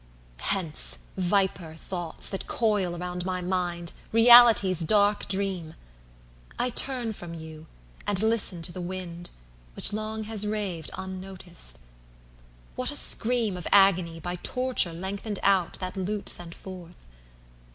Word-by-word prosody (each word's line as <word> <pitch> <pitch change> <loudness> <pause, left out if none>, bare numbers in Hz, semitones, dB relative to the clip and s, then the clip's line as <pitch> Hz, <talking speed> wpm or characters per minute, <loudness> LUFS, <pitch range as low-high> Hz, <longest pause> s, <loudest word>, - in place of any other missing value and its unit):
VIIHence, 180 -6 -1 0.2
viper 185 -3 0
thoughts, 175 +1 -4
that 195 - -4
coil 205 -6 0
around 180 0 -5
my 185 0 -3
mind, 175 -2 -2 0.2
Reality's 230 -5 +7
dark 205 +4 +3
dream!I - - -5
turn 245 -3 +4
from 175 -4 -9
you, 160 -1 -10 0.4
and 205 -2 +5
listen 215 -5 0
to 175 - -2
the 180 - -7
wind, 175 -1 -6 0.5
Which - - +2
long 215 +1 -3
has 210 -1 -2
raved 195 -7 -3
unnoticed. 185 - -6 0.9
What - - -1
a - - -3
screamOf 220 -7 +2
agony 185 -4 +4
by 175 +2 -5
torture 250 -3 0
lengthened 195 +4 -5
outThat 185 -1 0
lute 200 +2 -3
sent 170 -1 -1
forth! 180 -2 -12
185 Hz, 120 wpm, -26 LUFS, 170-205 Hz, 0.9 s, Reality's